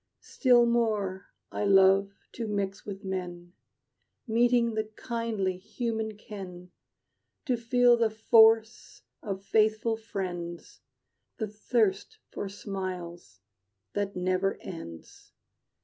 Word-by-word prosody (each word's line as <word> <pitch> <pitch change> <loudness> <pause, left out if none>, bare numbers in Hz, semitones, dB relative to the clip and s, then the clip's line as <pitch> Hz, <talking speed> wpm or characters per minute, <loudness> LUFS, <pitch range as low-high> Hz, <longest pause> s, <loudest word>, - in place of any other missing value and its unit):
Still 245 -3 +4
more 215 -5 0 0.2
I - - -3
love 195 0 +5 0.2
to 230 -2 -5
mix 200 -1 -3
with 200 0 -7
men, 175 -2 -5 0.7
Meeting 235 0 +3
the 220 0 -1
kindly 215 -4 -3
human 220 +1 -4
ken; 185 -4 -9 0.7
To 255 -4 +1
feel 240 +1 +4
the 230 -1 +2
force 225 +1 +3 0.2
of 195 -2 -5
faithful 220 +2 +2
friends 175 -6 -6 0.6
The 220 - -2
thirst 210 -2 0
for 200 - -5
smiles 180 - -6 0.5
that 200 -1 -2
never 185 +1 0
ends. 85 - -10
205 Hz, 100 wpm, -28 LUFS, 190-225 Hz, 0.7 s, love